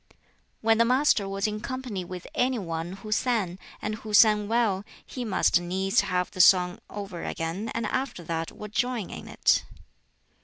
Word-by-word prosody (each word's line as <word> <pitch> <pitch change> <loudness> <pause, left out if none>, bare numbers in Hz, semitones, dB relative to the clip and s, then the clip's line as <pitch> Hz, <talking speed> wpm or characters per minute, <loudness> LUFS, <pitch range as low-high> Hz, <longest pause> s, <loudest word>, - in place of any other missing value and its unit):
When 225 0 +3
the - - +7
Master 250 -5 +3
was 195 0 -2
in 215 0 -1
company 250 -6 -4
with 180 0 -8
any 255 0 +1
one 165 -3 -4
who 215 +2 -9
sang, 215 -6 0 0.2
and 210 - -1
who 215 -2 -3
sang 210 -1 +6
well, 220 -4 +1 0.2
he 250 - -6
must 195 -5 +3
needs 190 +2 +1
have 180 -2 -1
the 185 - +2
song 180 -1 +5
over 200 -4 -6
again, 170 +7 -3
and 230 - -1
after 260 -9 -2
that 165 0 -3
would 210 0 -10
join 245 -6 -1
in - - -8
it. - - +2
205 Hz, 170 wpm, -27 LUFS, 180-230 Hz, 0.2 s, the